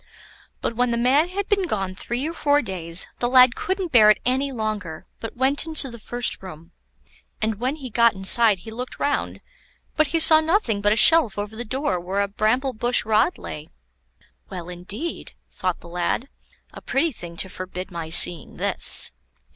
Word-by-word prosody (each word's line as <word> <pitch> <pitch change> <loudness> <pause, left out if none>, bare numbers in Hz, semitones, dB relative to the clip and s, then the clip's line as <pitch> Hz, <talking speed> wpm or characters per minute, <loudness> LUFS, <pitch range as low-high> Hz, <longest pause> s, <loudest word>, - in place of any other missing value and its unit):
But 235 - -3
when 245 +1 +1
the 235 - -1
man 270 +8 +2
had 395 +2 -4
been 395 -3 0
gone 195 - -3
three 240 +9 -4
or 330 - -5
four 290 -2 +1
days, 175 -4 0
the 240 - -1
lad 255 -1 +6
couldn't 380 -4 -3
bear 215 -4 +6
it 215 - +4
any 265 +3 0
longer, 215 -9 -5
but 225 +1 -8
went 270 +5 +1
into 310 -5 +1
the 235 - -11
first 240 +2 -3
room, 170 -2 -12 0.7
and 220 -1 -2
when 255 +4 -2
he 265 -6 -9
got 235 0 +3
inside 210 +2 +5
he 220 - -8
looked 250 +3 -7
round, 290 - -2 0.5
but 310 -1 +2
he 330 - -1
saw 315 0 +6
nothing 315 - 0
but 205 0 +2
a - - +3
shelf 250 -5 +6
over 205 +1 -5
the 235 - -5
door 260 -2 -2
where 190 +3 -2
a 200 - 0
bramble 235 +6 -1
bush 240 +1 0
rod 220 +11 +1
lay. 150 +1 -9 0.8
Well, 180 -2 -8
indeed! 200 - -6 0.2
thought 185 -2 -3
the - - -13
lad; 175 +9 -3 0.4
a - - -11
pretty 315 +5 -1
thing 175 -8 -10
to 190 - -3
forbid 185 0 -8
my 165 -2 -6
seeing 165 -1 +4
this. - - +1
230 Hz, 185 wpm, -22 LUFS, 190-275 Hz, 0.8 s, lad